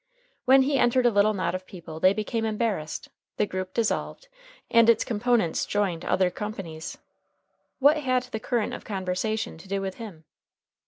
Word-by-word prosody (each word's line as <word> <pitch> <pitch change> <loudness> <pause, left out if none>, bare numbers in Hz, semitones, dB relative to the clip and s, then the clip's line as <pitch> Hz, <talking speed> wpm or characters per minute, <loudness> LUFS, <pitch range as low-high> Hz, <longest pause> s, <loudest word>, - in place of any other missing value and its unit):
When 265 +1 +6
he 275 0 +1
entered 245 +1 +3
a 240 - +5
little 205 +1 +3
knot 185 -2 -1
of 185 0 -5
people 165 -3 -9
they 185 +3 +5
became 215 +2 -2
embarrassed, 215 -8 -2 0.3
the - - +2
group 185 -1 -4
dissolved, 235 - -2 0.4
and 230 0 +6
its 230 - +5
component 225 -5 +1
parts - - -2
joined 190 -5 -1
other 185 -1 +2
companies. 180 -6 -6 0.8
What 290 +3 +5
had 255 -4 +1
the 250 -3 -6
current 230 0 -1
of - - -7
conversation 190 0 -2
to 180 - -13
do 195 +1 -1
with 195 -1 -4
him? 200 -9 -9
210 Hz, 170 wpm, -26 LUFS, 185-235 Hz, 0.8 s, When